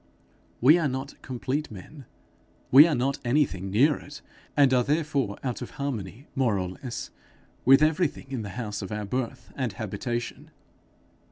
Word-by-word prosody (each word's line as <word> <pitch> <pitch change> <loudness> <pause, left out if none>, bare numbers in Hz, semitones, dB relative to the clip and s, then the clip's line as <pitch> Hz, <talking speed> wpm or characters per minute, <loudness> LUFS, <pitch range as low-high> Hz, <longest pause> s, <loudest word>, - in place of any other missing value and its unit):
We 150 +8 +7
are 160 - +1
not 135 +1 -5
complete 135 +4 -3
men, 125 +8 -11 0.7
we 145 +5 +10
are 160 - +1
not 130 +2 0
anything 120 -8 +1
near 135 +10 +4
it, 145 0 -11 0.3
and 140 -2 +5
are 125 -1 +4
therefore 145 -7 0
out 125 -3 -3
of - - -5
harmony, 125 -3 -4
more 125 -7 +1
or 90 -1 -2
less, 120 +6 -7 0.5
with 135 +3 +7
everything 155 -1 +1
in 130 -4 -2
the 105 - -6
house 105 -4 -4
of 95 - -6
our 105 0 -3
birth 125 +4 -4
and 125 -6 -2
habitation. 110 +4 -4
130 Hz, 160 wpm, -27 LUFS, 110-145 Hz, 0.7 s, we